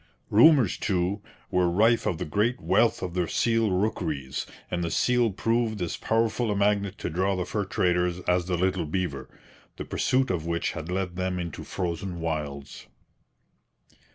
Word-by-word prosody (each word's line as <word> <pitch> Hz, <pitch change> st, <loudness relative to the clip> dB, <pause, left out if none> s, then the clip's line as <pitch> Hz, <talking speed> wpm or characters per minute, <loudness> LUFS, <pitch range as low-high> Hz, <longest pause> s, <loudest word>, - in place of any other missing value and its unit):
Rumours, 125 Hz, -, +6 dB
too, 95 Hz, +1 st, 0 dB, 0.3 s
were 90 Hz, -1 st, +3 dB
rife 110 Hz, +6 st, +3 dB
of 85 Hz, -, 0 dB
the -, -, -3 dB
great 110 Hz, +10 st, 0 dB
wealth 115 Hz, -, +2 dB
of 90 Hz, -2 st, -4 dB
the 90 Hz, -2 st, 0 dB
seal 115 Hz, -2 st, +1 dB
rookeries, 85 Hz, -9 st, -2 dB, 0.2 s
and 85 Hz, -1 st, -1 dB
the 85 Hz, -, -1 dB
seal 125 Hz, +5 st, +2 dB
proved 115 Hz, +2 st, 0 dB
as 85 Hz, -2 st, -2 dB
powerful 115 Hz, +1 st, 0 dB
a 105 Hz, -, 0 dB
magnet 100 Hz, -1 st, +1 dB
to -, -, -4 dB
draw 95 Hz, +4 st, +1 dB
the 90 Hz, -1 st, -2 dB
fur 105 Hz, -2 st, -2 dB
traders 90 Hz, -1 st, +1 dB
as 90 Hz, -1 st, +1 dB
the 90 Hz, -2 st, 0 dB
little 90 Hz, -2 st, 0 dB
beaver, 75 Hz, -6 st, -3 dB, 0.5 s
the -, -, -5 dB
pursuit 130 Hz, -1 st, +1 dB
of 85 Hz, -3 st, -2 dB
which 85 Hz, 0 st, -1 dB
had 80 Hz, 0 st, -7 dB
led 90 Hz, -1 st, -2 dB
them 95 Hz, 0 st, -1 dB
into 85 Hz, -3 st, -5 dB
frozen 85 Hz, 0 st, -4 dB
wilds. 75 Hz, -4 st, -4 dB
90 Hz, 165 wpm, -26 LUFS, 85-105 Hz, 0.5 s, Rumours